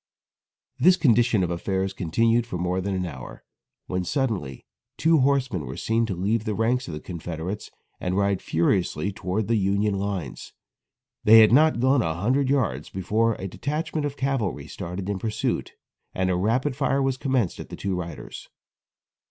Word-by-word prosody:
This 185 +2 +6
condition 115 - +3
of 90 - -1
affairs 95 +2 -1
continued 115 +7 +1
for 90 - -4
more 90 +1 -1
than 100 +1 -2
an 90 -1 -1
hour, 65 -7 -9 0.4
when 90 0 -2
suddenly 95 - -2 0.3
two 160 -1 +4
horsemen 130 - +1
were 65 - -6
seen 115 0 0
to 100 - -3
leave 105 +5 0
the 110 -2 -2
ranks 120 +4 0
of 80 - -5
the - - -5
Confederates 85 +3 -6 0.3
and 90 +1 -2
ride 100 -1 +1
furiously 85 +2 0
towards 95 +2 -2
the 115 0 +2
Union 100 +1 +1
lines. 95 -11 -4 0.7
They 110 +1 +9
had 110 - +6
not 155 +1 +5
gone 130 +1 +3
a 80 -6 -1
hundred 130 +9 +1
yards 135 -4 0
before 110 +5 0
a 95 - -5
detachment 150 - -2
of 145 - -8
cavalry 120 - -1
started 90 +3 -6
in 100 -2 -2
pursuit 110 +1 -2 0.4
and 95 0 +1
a - - +1
rapid 120 +9 0
fire 140 0 +1
was 135 -1 +1
commenced 130 - 0
at - - -8
the - - -7
two 100 -1 -3
riders. 85 -4 -7
100 Hz, 170 wpm, -25 LUFS, 90-125 Hz, 0.7 s, They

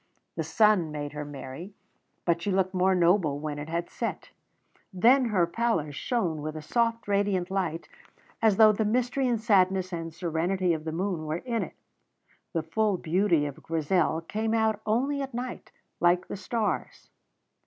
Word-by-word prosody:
The - - -1
sun 210 -8 +3
made 145 -1 -4
her 150 0 -4
merry, 145 +6 -8 0.5
but 170 -1 +1
she 200 - -1
looked 190 0 +1
more 185 +1 +3
noble 170 -4 +3
when 145 0 -4
it 150 +2 -6
had 170 +1 -2
set; - - -5 0.6
then 245 +8 +4
her 200 -7 +2
pallor 170 -6 -1
shone 165 - -1
with 155 +1 -5
a 155 - -5
soft, 230 +5 0
radiant 200 -2 0
light, 175 -4 -2 0.5
as 220 -3 +4
though 220 -1 +8
the 215 +1 0
mystery 250 +4 +1
and 235 -2 +1
sadness 190 -4 +2
and 165 -1 -4
serenity 175 +2 0
of 155 -1 -4
the 160 - -2
moon 170 -2 -2
were 155 +2 -1
in 235 -3 -1
it. - - -6 0.8
The 165 -2 -1
full 205 +4 0
beauty 170 -2 +2
of 145 -2 -6
Grizel 165 +1 0
came 220 +6 -2
out 220 -1 +1
only 270 +6 +1
at 270 -3 -5
night, 250 +1 -5 0.3
like 175 +1 +3
the - - -5
stars. 210 +3 -3
185 Hz, 170 wpm, -27 LUFS, 165-220 Hz, 0.8 s, though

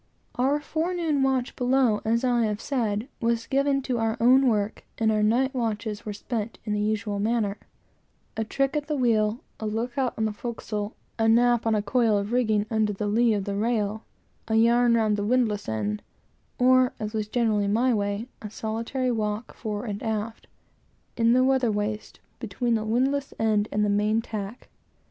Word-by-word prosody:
Our 270 +4 +1
forenoon 320 -1 -1
watch 265 -1 0
below, 250 -4 +2
as 230 +3 +1
I 240 -2 +2
have 210 -1 -2
said, 230 -4 -1
was 230 0 0
given 275 0 +1
to 250 -3 -1
our 225 0 0
own 255 +3 +5
work, 210 -3 0
and 220 -1 +2
our 215 -1 +1
night 245 +6 +2
watches 220 -3 -3
were - - -2
spent 220 +1 -4
in 210 - -1
the 210 - 0
usual 210 -1 -1
manner: 215 -1 0 0.8
a 220 - -1
trick 275 +6 -1
at 295 -1 -2
the 305 - -1
wheel, 225 -3 +1 0.2
a 220 - -3
look 235 +4 -2
out 255 -2 0
on 220 - 0
the 215 - -1
forecastle, 210 -2 -5 0.2
a 225 - +3
nap 240 0 +4
on 220 - +3
a 210 - 0
coil 230 -2 +2
of 200 +2 -3
rigging 220 -4 +2
under 215 -1 +1
the 205 +2 -3
lee 225 +2 +3
of 200 - -1
the 200 - -3
rail; 215 0 -1 0.4
a 220 - 0
yarn 235 +1 +4
round 215 -2 +2
the 205 - -1
windlass 215 -3 +1
end; 105 -1 -2 0.6
or, 255 0 +4
as 215 0 -4
was 215 -1 -2
generally 215 -3 +1
my 240 +5 +2
way, 205 +1 -1
a 210 - -6
solitary 230 +4 -2
walk 215 0 -2
fore 210 -1 -4
and 205 -2 -4
aft, 220 0 -3 0.7
in 230 0 +3
the 255 +1 +4
weather 260 -3 +2
waist, 210 +1 -3 0.2
between 240 -2 -1
the 220 -1 0
windlass 265 +5 0
end 215 -2 +1
and 210 0 +1
the - - +1
main 210 +2 +2
tack. 215 0 -6
225 Hz, 185 wpm, -26 LUFS, 210-245 Hz, 0.8 s, own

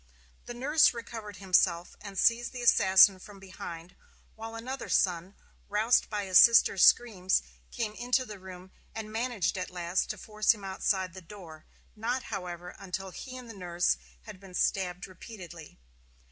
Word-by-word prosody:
The 240 - -7
nurse 285 +2 +3
recovered 225 -3 -8
himself 180 -2 +1
and 200 -2 -9
seized 235 +4 +2
the 245 -1 -6
assassin 190 -3 +6
from 200 +1 -13
behind, 180 -2 -9 0.4
while 225 +1 -8
another 250 +3 -6
son, 180 +1 0 0.3
roused 215 +4 +2
by 210 -2 -3
his 185 -2 +6
sister's 230 -5 +6
screams, 190 - +4 0.3
came 215 -2 -4
into 245 +3 0
the 210 -4 -10
room 185 0 -12 0.2
and 220 -1 -6
managed 220 -5 -1
at 185 - -4
last 175 0 -2
to 215 - -4
force 215 +3 +1
him 205 - -14
outside 190 -1 -1
the 190 - -10
door 165 -4 -13 0.3
not, 240 +4 -2
however, 180 -2 -6
until 190 0 -6
he 255 +6 -9
and 250 -1 -10
the 225 - -9
nurse 175 - 0 0.3
had 185 - -11
been 190 -2 -13
stabbed 180 -1 -1
repeatedly. 180 -4 -12
195 Hz, 160 wpm, -29 LUFS, 180-225 Hz, 0.4 s, assassin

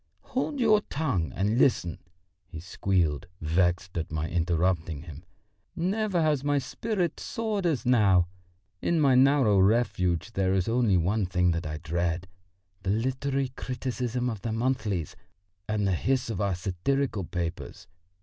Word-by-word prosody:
"Hold 275 +2 -1
your 215 -3 +4
tongue 110 - -1
and 105 +5 +1
listen!" 90 -11 +2 0.5
he 80 - -8
squealed, 85 -2 0
vexed 85 +2 0
at 80 - -5
my 80 +1 -2
interrupting 85 -2 0
him. 80 -2 -10 0.5
"Never 190 0 0
has 150 -3 +1
my 145 0 +2
spirit 180 - -2
soared 215 -5 -2
as 140 -9 -1
now. 100 -8 +4 0.5
In 170 - +1
my 140 -3 +4
narrow 130 -6 +5
refuge 95 -2 +1
there 95 -1 +1
is 95 -2 0
only 115 -4 +3
one 95 +4 +1
thing 90 0 +2
that 85 0 -2
I 75 0 -4
dread 85 +3 -2 0.5
the - - -3
literary 130 +5 0
criticisms 125 -1 -3
of 105 -4 -7
the 115 - -3
monthlies 110 - -1 0.5
and 105 -1 0
the 95 - +2
hiss 125 +6 0
of 95 - -3
our 100 -2 +1
satirical 100 +6 -1
papers. 85 -1 -5
105 Hz, 145 wpm, -27 LUFS, 90-135 Hz, 0.5 s, narrow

